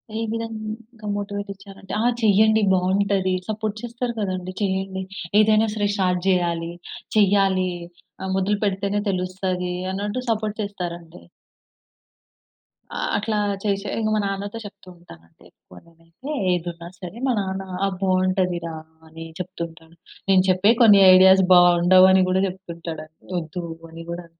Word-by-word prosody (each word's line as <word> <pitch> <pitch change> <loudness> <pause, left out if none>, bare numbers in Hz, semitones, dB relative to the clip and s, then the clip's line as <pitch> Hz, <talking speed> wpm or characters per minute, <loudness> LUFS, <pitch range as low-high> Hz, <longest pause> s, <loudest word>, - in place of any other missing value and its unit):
ఏ - - -2
విధంగా 225 0 -6
మోటివేటిచ్చారంటే 200 -1 -7
ఆ! - - 0 0.2
చేయండి. 220 +1 +4
బావుంటది. 190 +1 +1
సపోర్ట్ 215 -1 -3
చేస్తారు 240 0 -4
కదండి. 185 -2 -3
చేయండి. 190 -1 -2 0.4
ఏదైనా 215 +1 +4
సరే 205 -1 0
స్టార్ట్ 180 -3 +1
జేయాలి. 170 -2 0 0.4
చెయ్యాలి. 195 -2 +3 0.5
ఆహ్, 190 - -3
మొదలు 200 +2 +1
పెడితేనే 200 +1 -1
తెలుస్తది, 185 -1 -2 0.2
అన్నట్టు 205 +5 -3
సపోర్ట్ 215 -2 -1
చేస్తారండి. 175 - -6 1.7
ఆ! - - -4 0.2
అట్లా 215 +1 -1 0.3
చేసే 200 -1 -1
ఇంక, 215 -1 0
మా - - +1
నాన్నతో 200 +2 -4
చెప్తూంటానండి. 170 - -15
ఎక్కువ 90 - -19
నేనైతే 165 - -14 0.2
ఏదున్నా 170 -1 -3
సరే, 185 +3 -8
మా - - +2
నాన్న 190 -1 -3 0.2
"ఆ! - - +2
బావుంటది 185 -1 +1
రా" 165 - -5 0.3
అని 165 +1 -10
చెప్తూ 180 0 -7
ఉంటాను. 165 0 -19 0.3
నేను 190 -1 +5
చెప్పే 185 +4 +4
కొన్ని 210 -4 +8
ఐడియాస్ 190 +1 +7
బావుండవని 180 +2 +6
గూడా 185 +1 +2
చెప్తుంటాడంటే, 170 -4 -8 0.2
ఒద్దు 170 +2 -6 0.3
అని 165 0 -9
గూడా 170 0 -6
190 Hz, 125 wpm, -22 LUFS, 180-205 Hz, 1.7 s, కొన్ని